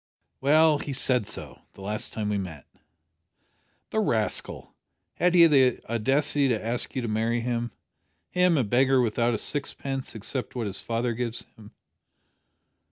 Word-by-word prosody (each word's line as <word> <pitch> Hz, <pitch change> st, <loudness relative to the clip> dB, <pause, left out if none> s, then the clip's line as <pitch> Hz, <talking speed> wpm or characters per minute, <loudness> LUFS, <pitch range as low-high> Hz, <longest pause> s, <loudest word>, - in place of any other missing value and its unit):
"Well, 155 Hz, +2 st, +4 dB
he 145 Hz, -, -5 dB
said 125 Hz, -4 st, +2 dB
so -, -, -8 dB
the -, -, -14 dB
last 105 Hz, +2 st, -3 dB
time 105 Hz, -2 st, -3 dB
we 105 Hz, -1 st, 0 dB
met." 80 Hz, -7 st, -7 dB, 1.3 s
"The -, -, 0 dB
rascal! -, -, -1 dB, 0.4 s
Had 180 Hz, 0 st, +1 dB
he 170 Hz, -1 st, +8 dB
the 135 Hz, -6 st, +4 dB
audacity 135 Hz, +5 st, +1 dB
to 120 Hz, -4 st, 0 dB
ask 115 Hz, +5 st, -2 dB
you 130 Hz, -, -2 dB
to -, -, -2 dB
marry 115 Hz, +2 st, 0 dB
him? 120 Hz, 0 st, -2 dB, 0.6 s
him 180 Hz, -2 st, +3 dB
a 135 Hz, -, +2 dB
beggar, 130 Hz, +4 st, +3 dB
without 120 Hz, 0 st, +1 dB
a -, -, -1 dB
sixpence 135 Hz, 0 st, -1 dB
except 125 Hz, +5 st, -4 dB
what 120 Hz, -2 st, -2 dB
his 100 Hz, -2 st, -4 dB
father 115 Hz, +1 st, -2 dB
gives 120 Hz, 0 st, -3 dB
him?" 105 Hz, -1 st, -16 dB
120 Hz, 155 wpm, -26 LUFS, 110-140 Hz, 1.3 s, he